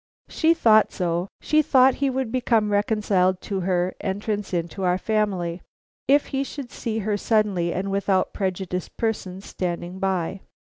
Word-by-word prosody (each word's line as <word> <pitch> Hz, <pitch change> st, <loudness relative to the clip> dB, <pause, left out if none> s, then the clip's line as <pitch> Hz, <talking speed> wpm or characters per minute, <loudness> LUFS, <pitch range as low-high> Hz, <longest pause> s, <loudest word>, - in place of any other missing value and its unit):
"She 330 Hz, +1 st, +3 dB
thought 220 Hz, -8 st, +5 dB
so; 175 Hz, 0 st, -1 dB
she 310 Hz, 0 st, +3 dB
thought 265 Hz, -3 st, +5 dB
he 280 Hz, -, +3 dB
would 260 Hz, -3 st, -2 dB
become 230 Hz, -4 st, +1 dB
reconciled 205 Hz, -3 st, +2 dB
to 195 Hz, -2 st, -3 dB
her 180 Hz, 0 st, 0 dB
entrance 205 Hz, +1 st, -3 dB
into 175 Hz, +2 st, -3 dB
our 180 Hz, -1 st, +2 dB
family 190 Hz, -5 st, -1 dB, 0.5 s
if 280 Hz, +2 st, +4 dB
he 270 Hz, 0 st, +1 dB
should 275 Hz, -2 st, -7 dB
see 225 Hz, -1 st, -3 dB
her 210 Hz, -1 st, 0 dB
suddenly 205 Hz, -6 st, +1 dB
and 195 Hz, +3 st, -2 dB
without 195 Hz, -1 st, +1 dB
prejudiced 185 Hz, -2 st, -3 dB
persons 200 Hz, -4 st, -3 dB
standing 175 Hz, 0 st, -4 dB
by." 190 Hz, -1 st, -1 dB
200 Hz, 150 wpm, -24 LUFS, 185-225 Hz, 0.5 s, thought